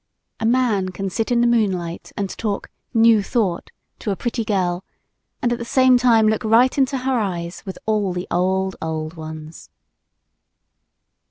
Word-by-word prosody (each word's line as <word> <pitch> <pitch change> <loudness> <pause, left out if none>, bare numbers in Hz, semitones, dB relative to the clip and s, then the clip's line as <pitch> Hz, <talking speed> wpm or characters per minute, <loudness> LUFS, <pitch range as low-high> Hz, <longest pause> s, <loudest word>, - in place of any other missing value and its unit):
A 220 - 0
man 230 -6 +2
can 195 +1 -4
sit 225 +5 -2
in 240 -1 +3
the - - +4
moonlight 190 -8 0
and 200 - -1
talk 205 +1 -4 0.2
"New 225 -1 +5
Thought" 200 -5 -1 0.3
to - - -4
a 195 - 0
pretty 235 +3 -2
girl 185 -4 -1 0.6
and 240 - +2
at 235 - -4
the - - -4
same 255 +1 +4
time 230 -3 +4
look 220 0 +1
right 230 +4 +4
into 270 -1 +1
her 260 -1 0
eyes 175 -4 -3
with 190 - -5
all 210 -3 +1
the 180 +1 -4
old, 190 +1 0
old 160 0 -3
ones. 155 -1 -9
210 Hz, 165 wpm, -21 LUFS, 180-235 Hz, 0.6 s, New